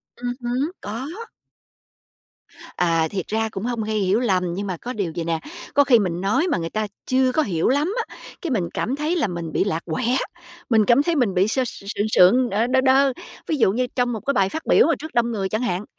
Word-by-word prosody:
Ừm 245 0 -3
hứm, 255 +7 -1
có. 230 +7 -5 1.7
À, 165 -2 +2
thiệt 190 -1 -4
ra 220 +1 -1
cũng 195 +2 -5
hông 240 -2 -2
gây 215 0 -2
hiểu 195 +3 +2
lầm. 185 -7 0
Nhưng 200 +2 -4
mà 180 -3 -3
có 245 +7 -6
điều 195 -6 -2
vầy 170 - -3
nè, 165 -1 -1 0.3
có 285 - +5
khi 245 -5 +5
mình 180 -3 -2
nói 260 - +1
mà 315 - +1
người 165 -1 -3
ta 215 +2 -2 0.2
chưa 255 0 +2
có 315 - +2
hiểu 175 - 0
lắm 295 +9 +1
á, - - -14 0.3
cái 335 -6 -3
mình 185 -8 0
cảm 255 +5 -1
thấy 305 +4 -1
là 310 -10 +1
mình 170 -3 -5
bị - - +1
lạc 170 -5 -2
quẻ, 240 +10 0 0.5
mình 220 -3 +4
cảm 255 +4 +4
thấy 340 0 0
mình 245 -9 +1
bị 185 +2 +3
sơ 255 +4 +1
sượng 205 -1 -4
sượng, 240 +8 +5
ờ, 220 +4 +1
đơ 260 +1 +3
đơ. 270 0 +4 0.3
Ví 315 - 0
dụ 195 - +4
như 250 +3 0
trong 245 -1 +1
một 220 - -3
cái 280 - +1
bài 195 -5 +2
phát 320 - -6
biểu - - +5
mà 330 - +3
trước 315 +1 -8
đông 235 0 +2
người 195 -3 -2
chẳng 215 - -1
hạn, 210 -5 -2
225 Hz, 240 wpm, -22 LUFS, 190-260 Hz, 1.7 s, có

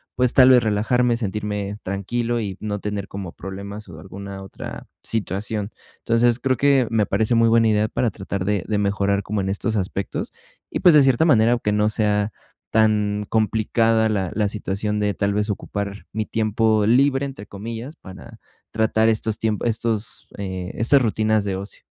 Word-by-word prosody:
pues, 125 -1 +2
tal 130 -1 +7
vez 125 -2 +6
relajarme, 115 +3 +2
sentirme 105 -2 -3
tranquilo 115 +5 -2
y 100 -3 -5
no 105 -1 -3
tener 105 -1 -4
como 95 -3 -7
problemas 100 +2 -8
o 80 -2 -10
alguna 95 +3 -8
otra 95 - -9 0.2
situación. 105 0 -2 0.3
Entonces, 120 +1 +2
creo 130 -1 0
que 135 -2 +3
me 110 -2 +2
parece 110 +4 +1
muy 115 0 +4
buena 115 0 +4
idea 105 0 +2
para 120 - 0
tratar 95 -1 -4
de 100 -2 0
de 105 - 0
mejorar 100 0 +1
como 105 0 -2
en 95 - -2
estos 105 +3 -1
aspectos, 95 0 -3 0.4
y - - -2
pues 175 -4 +7
de 145 - +7
cierta 135 +2 +3
manera, 115 -7 +4
aunque 115 -3 -1
no 105 0 +2
sea 105 -1 +1 0.4
tan 105 -1 +2
complicada 110 +1 +2
la 95 -4 -1
la 105 -1 +1
situación 105 0 -3
de, 105 -1 0
tal 100 +1 0
vez, 105 +1 -1
ocupar 100 0 -4
"mi 110 0 -2
tiempo 110 -1 +1
libre", 135 +3 +3
entre 135 -7 -8
comillas, 115 +8 -7
para 95 -1 -12 0.3
tratar 110 0 +2
estos 110 -1 0
tiemp 110 -2 -1
estos, 115 +1 -2
eh, 95 -2 -5
estas 135 +5 +4
rutinas 110 -2 +1
de 100 -2 -1
ocio. 100 +2 -10
105 Hz, 175 wpm, -22 LUFS, 100-115 Hz, 0.4 s, tal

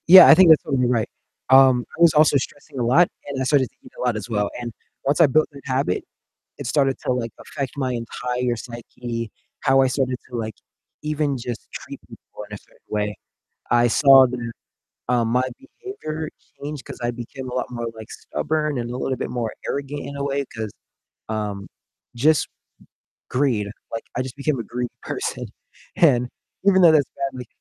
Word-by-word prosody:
Yeah, 185 +2 +11
I - - +10
think 185 -2 +7
that's 160 - +7
totally 130 -4 +1
right. 120 -3 +1 0.4
Um, 130 -2 +6
I - - -6
was 170 -2 +7
also 150 -1 +5
stressing 135 0 -6
a - - +1
lot, 150 +9 +5 0.2
and 140 -2 -4
I - - +2
started 130 -1 +3
thinking - - -18
a - - -7
lot, 120 -3 +1
as 105 +1 -5
well, 105 -2 0
and 120 -1 -5 0.3
once 140 +2 +2
I 165 - +8
built 155 +4 +3
that 140 -1 -12
habit, 130 -8 0 0.5
it - - -6
started 135 +1 +2
to, - - +1
like, 120 -2 -2
affect 135 -3 -5
my 130 -2 0
entire 125 +1 -2
psyche, 115 -1 -6 0.3
how 135 -1 +4
I 130 - +4
started 130 -1 0
to, 125 - -7
like, 110 -1 -4 0.5
even 150 -2 0
just 120 -1 -6
treat - - -8
people - - -12
in - - -10
a - - -6
certain - - -24
way. 105 0 -1 0.6
I 120 0 +4
saw 135 +1 +7
that, 120 -2 -5 0.6
um, 120 -2 +2
my 125 +2 +1
behavior 275 - -6 0.3
changed, 145 -1 -6
'cause - - -9
I 120 - +1
became 125 +2 -7
a 125 - -5
lot 125 - -2
more, 120 -1 -4
like, 110 -1 -11
stubborn, 150 -3 -2
and 120 0 -3
a 125 - -4
little 130 0 -1
bit - - -4
more 115 -3 -2 0.2
arrogant 140 +1 -3
in 140 - -7
a 140 - -2
way, 140 0 -1
'cause, 110 -3 -5 0.6
um, 105 -3 -3 0.5
just 150 +6 +3
m - - -50 0.8
greed, 125 -6 +1 0.3
like, 115 - -4
I 125 - +1
just 130 0 -8
became 140 0 0
a - - -1
greedy 120 +1 -4
person, - - -3 0.5
and 125 -7 +4 0.4
even 195 -1 +5
though 170 -2 +8
that's 150 -3 +3 0.2
badly 125 -2 -8
130 Hz, 195 wpm, -22 LUFS, 120-145 Hz, 0.8 s, Yeah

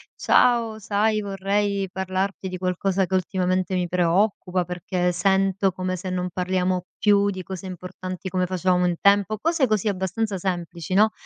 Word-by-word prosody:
"Ciao, 230 -3 +3
sai 215 +1 +1
vorrei 200 0 -1
parlarti 190 +1 -2
di 185 0 -5
qualcosa 185 +1 0
che 190 - -7
ultimamente 185 0 0
mi 180 -1 0
preoccupa, 180 +1 +1
perché 180 +1 -1
sento 195 +1 +2
come 185 0 -3
se 185 +1 -5
non 180 0 -2
parliamo 180 0 0
più 205 -1 +3
di 185 -2 -5
cose 190 +1 -7
importanti 185 +1 -6
come 185 -1 0
facevamo 180 0 +1
un 175 -1 +1
tempo." 200 +1 +3
Cose 320 - +1
così 215 -1 0
abbastanza 195 +1 -1
semplici, 175 -1 -3
no, 215 +2 +5
190 Hz, 155 wpm, -24 LUFS, 180-200 Hz, -, no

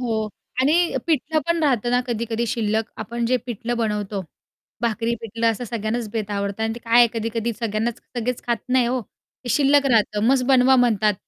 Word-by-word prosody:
हो 220 -3 -1 0.3
आणि 335 +6 +3
पिठलं 310 0 +1
पण 335 -1 +1
राहतं 245 -5 +1
ना 245 - +3
कधी-कधी 235 0 -2
शिल्लक. 220 -1 0
आपण 235 +2 -4
जे 255 +1 +3
पिठलं 240 +1 -3
बनवतो 210 -3 -2 0.6
भाकरी-पिठलं 230 0 -1
असं 225 +2 -4
सगळ्यांनाच 225 0 -3
बेत 215 -2 -3
आवडतं 200 +1 -2
आणि 225 0 -1
ते - - -7
काय 230 +1 +4
आहे 240 - +8
कधी-कधी 230 +1 -2
सगळ्यांनाच 225 +1 -1 0.2
सगळेच 240 +1 -2
खात 235 -1 +1
नाही 250 -1 +3
हो. 255 +1 0
ते 245 - -16
शिल्लक 280 +2 +4
राहतं 210 -2 +2
मस्त 260 0 +3
बनवा 260 0 +5
म्हणतात 220 -4 +3
235 Hz, 175 wpm, -22 LUFS, 220-250 Hz, 0.6 s, आहे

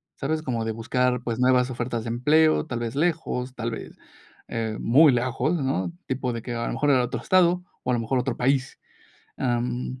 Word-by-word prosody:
¿sabes?, 155 +3 -2
como 120 -6 -2
de 110 - -2
buscar, 125 +2 0
pues, 115 -1 -3
nuevas 125 0 +3
ofertas 120 -2 -3
de - - -5
empleo, 155 +7 +3
tal 125 -6 -4
vez, 120 +1 -4
lejos, 150 -6 -1
tal 115 -1 -3
vez, - - -8 0.5
eh, 110 -2 -3
muy 140 +5 +6
lejos, 130 +6 0
¿no? 130 - -1 0.2
Tipo 130 -1 -2
de 115 - -4
que, 120 +1 -5
a 115 0 -2
lo - - -2
mejor, 145 +1 +2
en 130 - +4
otro 125 0 -1
estado, 180 -1 +3 0.2
o 125 - 0
a - - +2
lo 120 - +1
mejor, 125 +3 0
otro 125 -1 -2
país, 135 +1 0 0.6
am, 125 0 -2
125 Hz, 205 wpm, -25 LUFS, 120-140 Hz, 0.6 s, muy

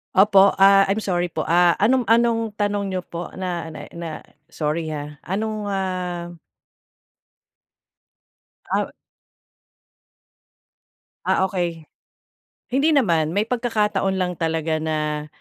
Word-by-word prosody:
Opo, 195 0 +6
ah, 195 0 +7
I'm 205 - 0
sorry 175 -4 -1
po, 155 - -3
ah, 175 +1 +5
anong 250 +5 +3
anong 230 0 +2
tanong 205 -1 -1
niyo 185 - -1
po 175 0 -7
na 175 -3 -4
na 155 - -9
na 170 -1 -5 0.4
sorry, 155 +1 -2
ha. 150 0 -6
Anong, 215 +3 -3
ah 180 -2 -3 2.3
Ah - - 0 2.3
Ah, 190 - +2
okey. 175 -4 -3 0.9
Hindi 285 +5 +3
naman, 170 - +2
may 205 - +2
pagkakataon 225 -5 0
lang 180 -2 -2
talaga 160 -1 0
na, 150 -1 -2
185 Hz, 110 wpm, -22 LUFS, 165-205 Hz, 2.3 s, ah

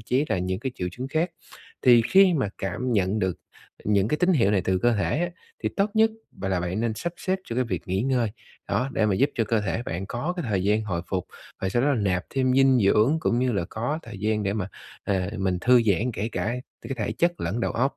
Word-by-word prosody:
chí 125 +6 +1
là - - +1
những 95 +1 -2
cái 130 - -3
triệu 90 - -3
chứng 130 +5 -6
khác 160 +5 0 0.5
thì 120 -2 +7
khi 190 -2 +6
mà 135 -9 0
cảm 120 +7 -2
nhận 100 0 +1
được 95 -4 0 0.5
những 100 0 +2
cái 150 - +1
tín 180 +4 +3
hiệu 115 - +3
này 100 -2 +3
từ 95 0 +1
cơ 120 +5 +3
thể 105 +7 0
á, 175 0 0 0.3
thì - - +1
tốt 200 +1 +2
nhất 220 0 +5 0.2
bạn 95 0 -5
là 95 -2 +1
bạn 90 +4 -2
nên 115 -2 0
sắp 175 +9 -4
xếp 190 0 -1
cho 115 - -5
cái 130 - +2
việc 115 - -3
nghỉ 95 +3 0
ngơi. 125 -3 +1 0.4
Đó, 130 - 0
để 110 - +2
mà 100 - +2
giúp 140 +8 +2
cho 115 - +1
cơ 110 0 +1
thể 105 +2 -2
bạn 95 -3 -4
có 135 +10 -2
cái 175 - -3
thời 95 -3 0
gian 105 +2 +2
hồi 90 -5 -3
phục, 95 -2 -2 0.3
và 95 - 0
sau 120 +5 +1
đó 140 - +3
là 145 - +3
nạp 90 -3 0
thêm 130 -1 +1
dinh 135 -1 +5
dưỡng, 105 +8 +4
cũng 120 - +1
như 125 0 +1
là 100 -5 0
có 120 +8 -2
thời 105 - -9
gian 105 +1 0
để 100 - 0
mà, 100 -2 -3 0.4
ờ, 95 -1 0
mình 95 -2 0
thư 125 +2 +5
giãn 110 +3 +1
kể 105 +1 -2
cả 115 - -1 0.3
cái - - -5
thể 105 -4 -2
chất 175 0 0
lẫn 100 +8 -2
đầu - - 0
óc. 135 +4 0
110 Hz, 260 wpm, -25 LUFS, 95-130 Hz, 0.5 s, thì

